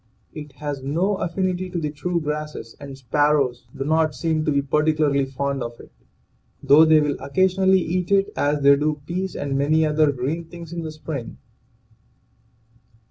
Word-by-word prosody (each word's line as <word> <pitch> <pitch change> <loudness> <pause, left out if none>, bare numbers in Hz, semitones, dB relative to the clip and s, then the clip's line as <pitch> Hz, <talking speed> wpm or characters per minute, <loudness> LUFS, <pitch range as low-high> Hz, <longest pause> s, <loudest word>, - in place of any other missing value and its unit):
It 150 -2 -9
has 145 -1 -5
no 170 +9 0
affinity 185 +1 -2
to 180 - -5
the 150 -2 -3
true 170 +4 -2
grasses, 150 -6 -5
and 135 -1 -9
sparrows 135 -1 +1
do 135 - -3
not 155 -1 +1
seem 155 +3 -1
to 155 - +1
be 140 -1 +1
particularly 150 -1 +1
fond 140 0 -3
of 120 0 -6
it, - - -14 0.7
though 145 +3 +7
they 155 -1 +6
will 145 -2 0
occasionally 190 +6 +2
eat 180 +2 -2
it 195 0 +2
as 145 0 0
they 140 0 +7
do 150 +1 -1
peas 185 +3 -3
and 140 -1 -3
many 155 +3 +2
other 155 -1 +3
green 140 +6 -3
things 170 0 -10
in 170 - -4
the 160 -1 -5
spring. 155 -5 -7
150 Hz, 170 wpm, -22 LUFS, 140-165 Hz, 0.7 s, though